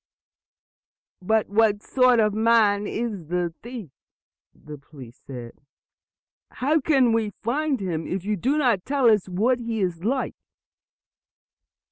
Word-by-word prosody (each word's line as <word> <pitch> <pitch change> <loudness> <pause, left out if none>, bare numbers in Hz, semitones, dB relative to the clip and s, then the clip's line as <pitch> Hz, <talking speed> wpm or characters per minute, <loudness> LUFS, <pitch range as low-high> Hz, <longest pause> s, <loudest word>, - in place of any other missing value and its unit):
"But 220 +3 +1
what 210 0 +2
sort 255 -2 +3
of 210 -2 +2
a - - -6
man 215 -2 +3
is 215 -8 -4
the 175 0 -2
thief?" 235 - -8 0.6
the 150 -1 -12
police 135 -4 -14
asked. 120 -3 -9 0.9
"How 300 +5 0
can 260 -5 +3
we 220 -3 -1
find 275 +3 0
him, 170 -5 -3
if 190 0 -4
you 210 0 0
do 265 - 0
not 240 -11 +1
tell 270 -4 +3
us 210 -3 +1
what 230 +8 +1
he 230 -2 -3
is 175 -3 -2
like?" 260 +5 -1
215 Hz, 135 wpm, -24 LUFS, 180-245 Hz, 0.9 s, sort